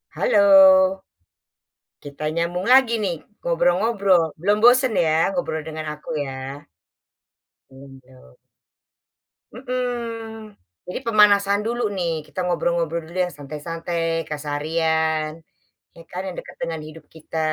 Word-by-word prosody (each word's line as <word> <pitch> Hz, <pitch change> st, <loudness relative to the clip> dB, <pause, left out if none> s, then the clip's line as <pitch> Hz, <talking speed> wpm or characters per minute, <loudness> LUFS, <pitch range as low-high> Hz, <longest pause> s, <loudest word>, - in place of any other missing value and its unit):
Halo. 205 Hz, -, +2 dB, 1.6 s
Kita 145 Hz, +1 st, -10 dB
nyambung 175 Hz, +2 st, -2 dB
lagi 260 Hz, -3 st, +5 dB
nih 185 Hz, -4 st, -1 dB, 0.3 s
ngobrol-ngobrol 180 Hz, +2 st, +2 dB, 0.2 s
belum 205 Hz, +4 st, +2 dB
bosen 255 Hz, 0 st, +5 dB
ya 160 Hz, -, +1 dB, 0.2 s
ngobrol 195 Hz, -10 st, -2 dB
dengan 155 Hz, 0 st, -6 dB
aku 150 Hz, -, -18 dB, 0.2 s
ya? 135 Hz, +2 st, -8 dB, 1.0 s
Belum 135 Hz, 0 st, -14 dB
dong. 125 Hz, -, -20 dB, 1.2 s
Mhm, 235 Hz, -3 st, -5 dB, 0.4 s
jadi 180 Hz, -, -4 dB
pemanasan 205 Hz, -2 st, +4 dB
dulu 240 Hz, +2 st, -2 dB
nih 175 Hz, -3 st, -1 dB, 0.2 s
kita -, -, -8 dB
ngobrol 175 Hz, -1 st, 0 dB
ngobrol 170 Hz, 0 st, -1 dB
dulu 170 Hz, -, -13 dB
ya -, -, -6 dB
santai-santai 165 Hz, +4 st, -6 dB, 0.3 s
keseharian, 155 Hz, +1 st, -1 dB, 0.6 s
ya 170 Hz, -, -13 dB
kan 180 Hz, -, -4 dB
yang 185 Hz, -, -6 dB
dekat -, -, -12 dB
dengan 165 Hz, -2 st, -4 dB
hidup 155 Hz, 0 st, -13 dB
kita. 160 Hz, 0 st, -8 dB
170 Hz, 115 wpm, -22 LUFS, 155-210 Hz, 1.6 s, lagi